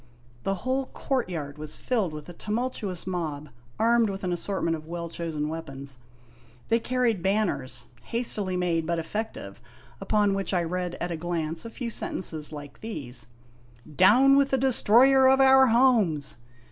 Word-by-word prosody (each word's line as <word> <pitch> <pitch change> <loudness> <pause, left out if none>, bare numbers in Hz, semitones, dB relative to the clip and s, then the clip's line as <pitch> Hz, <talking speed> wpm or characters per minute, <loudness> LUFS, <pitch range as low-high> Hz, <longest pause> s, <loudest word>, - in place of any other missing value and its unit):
The 195 +9 -1
whole 260 +1 0
courtyard 170 - -3
was 155 0 -5
filled 220 -9 -1
with 150 -1 -8
a 175 - -9
tumultuous 210 -3 -3
mob 155 -5 -4 0.3
armed 230 0 +3
with 195 0 -5
an 180 -1 0
assortment 175 -1 -1
of 155 0 -10
well 170 0 -5
chosen 160 -3 -3
weapons. 140 -4 -6 0.7
They 230 - +3
carried 240 -4 0
banners, 190 -9 -1 0.2
hastily 210 -6 0
made 170 -3 0
but 170 0 0
effective, 165 - -5 0.4
upon 205 0 +2
which 195 0 -1
I 175 - +2
read 180 +1 -3
at 175 - -4
a 165 - -3
glance 165 0 -3
a - - -5
few 235 0 -5
sen - - -3
tences 155 -5 -3
like 145 -2 -10
these: 140 - -6 0.3
" 120 +5 -20
Down 270 +6 +6
with 280 -1 +3
the 265 - +2
Destroyer 265 +1 +5
of 265 0 +4
our 265 0 +7
Homes 225 - +3
185 Hz, 160 wpm, -26 LUFS, 160-230 Hz, 0.7 s, our